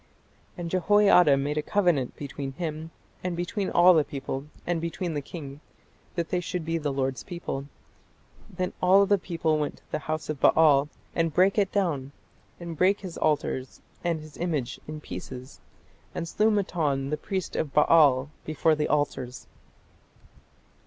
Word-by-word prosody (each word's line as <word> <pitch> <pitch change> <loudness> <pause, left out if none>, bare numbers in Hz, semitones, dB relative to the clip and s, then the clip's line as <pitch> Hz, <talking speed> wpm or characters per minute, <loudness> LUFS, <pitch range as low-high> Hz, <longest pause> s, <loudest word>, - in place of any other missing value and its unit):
"And 170 -1 -5
Jehoiada 185 -5 +5
made 145 +2 -1
a - - 0
covenant 170 -7 +1
between 140 -1 -6
him, 160 0 -4 0.3
and 180 -2 -2
between 190 +3 -2
all 180 +1 +7
the 155 -3 +4
people, 135 0 -5 0.2
and 170 -2 -1
between 170 +1 -3
the 145 - -2
king, 140 -2 -8 0.6
that 170 -3 -2
they 180 - +1
should 175 -1 -4
be 165 +1 -1
the 145 -2 -1
Lord's 135 -1 -2
people. 170 -6 -5 0.8
Then 185 0 -3
all 190 +2 +6
the 200 0 +3
people 165 -3 0
went 150 - -2
to - - -27
the - - -1
house 155 0 -4
of 155 -3 -4
Baal, 150 -3 +5 0.2
and 165 -1 +1
brake 190 +6 +3
it 195 -2 +1
down, 150 -9 -1 0.5
and 170 -1 -6
brake 190 +5 +3
his 185 -4 -7
altars 145 -4 -1 0.2
and 170 -2 0
his 155 -1 -12
images 150 -8 -2
in 155 0 -6
pieces, 125 - -8 0.5
and 170 - -3
slew 210 +6 +2
Mattan 155 -9 0
the - - +2
priest 185 +4 -4
of 150 - -1
Baal 150 -2 +5
before 155 +1 +2
the 150 -1 0
altars." 130 -4 -1
160 Hz, 160 wpm, -27 LUFS, 145-180 Hz, 0.8 s, all